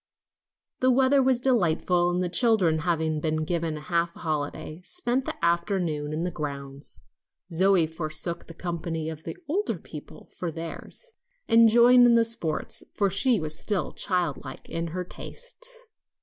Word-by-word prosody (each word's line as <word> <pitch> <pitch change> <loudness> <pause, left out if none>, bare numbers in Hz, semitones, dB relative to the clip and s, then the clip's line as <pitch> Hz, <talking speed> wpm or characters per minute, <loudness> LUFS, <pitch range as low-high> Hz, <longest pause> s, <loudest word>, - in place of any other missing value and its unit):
The 255 - +3
weather 265 +2 +4
was 260 -2 +3
delightful, 180 -7 +2
and 180 +1 0
the - - 0
children 180 -5 +3
having 160 -2 0
been 155 0 -1
given 165 -2 -2
a - - -8
half 170 +1 0
holiday, 155 +1 -4
spent 260 - -1
the - - -3
afternoon 170 -4 0
in 155 +2 -2
the 180 - -2
grounds. 140 -2 -7 0.5
Zoe 185 0 +4
forsook 160 +1 -3
the 165 - -11
company 165 -2 -4
of 160 0 -10
the - - -6
older 390 +8 -1
people - - -12
for 175 - -2
theirs, 165 - -7 0.4
and 230 -1 +6
joined 245 +2 +7
in 235 - +5
their 230 - +5
sports, 225 -9 -1
for 200 -2 +1
she 225 +4 +2
was 155 -1 -2
still 205 -4 -1
child 180 -7 0
like 130 -2 -9
in 165 0 -3
her 180 +3 -4
tastes. - - -11
175 Hz, 160 wpm, -26 LUFS, 160-230 Hz, 0.5 s, joined